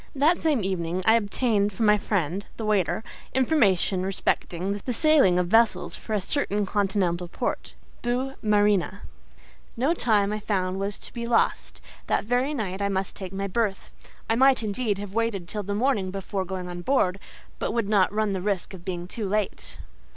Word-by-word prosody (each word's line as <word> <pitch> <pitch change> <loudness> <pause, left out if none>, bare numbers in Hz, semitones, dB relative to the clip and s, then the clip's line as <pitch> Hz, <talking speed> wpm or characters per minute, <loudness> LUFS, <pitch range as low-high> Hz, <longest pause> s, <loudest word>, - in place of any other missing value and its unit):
That 305 +6 +3
same 295 -9 +1
evening 185 -1 -2
I 220 - +6
obtained 210 -1 +1
from 215 +3 -1
my 210 0 +5
friend, 195 -1 -1
the 225 - -4
waiter, 210 0 +1 0.3
information 210 - +3
respecting, 195 0 -1
the 250 - -2
sailing 280 - +4
of 180 - +2
vessels 225 +5 +3
for 220 - -6
a 210 - +2
certain 205 -2 0
continental 190 -3 0
port, - - -4 0.3
Boue 250 +3 -1
Marine. 205 -3 +2 0.8
No 270 +8 +2
time, 210 -9 +2
I 215 - -2
found, 190 -3 -1
was 200 +1 -1
to - - -11
be 235 0 -4
lost: 235 -1 0 0.3
that - - +1
very 250 +6 +1
night 200 -5 -3
I 200 - +1
must 190 -1 -2
take 190 -2 -6
my 195 +1 -3
berth. 200 0 -2 0.4
I - - +2
might, 265 0 +4
indeed, 210 0 -1
have 200 -1 -7
waited 225 -6 -1
till 210 +3 -3
the 200 0 -3
morning 215 -5 +1
before 195 0 -3
going 185 0 -5
on 175 0 -6
board, 195 -5 +1 0.4
but - - -1
would 230 -2 0
not 200 -3 +3
run 215 0 0
the 190 -2 -2
risk 195 -1 -2
of 180 -2 -10
being 175 -2 -4
too 205 +1 -4
late. 210 -1 -2
205 Hz, 180 wpm, -26 LUFS, 190-230 Hz, 0.8 s, I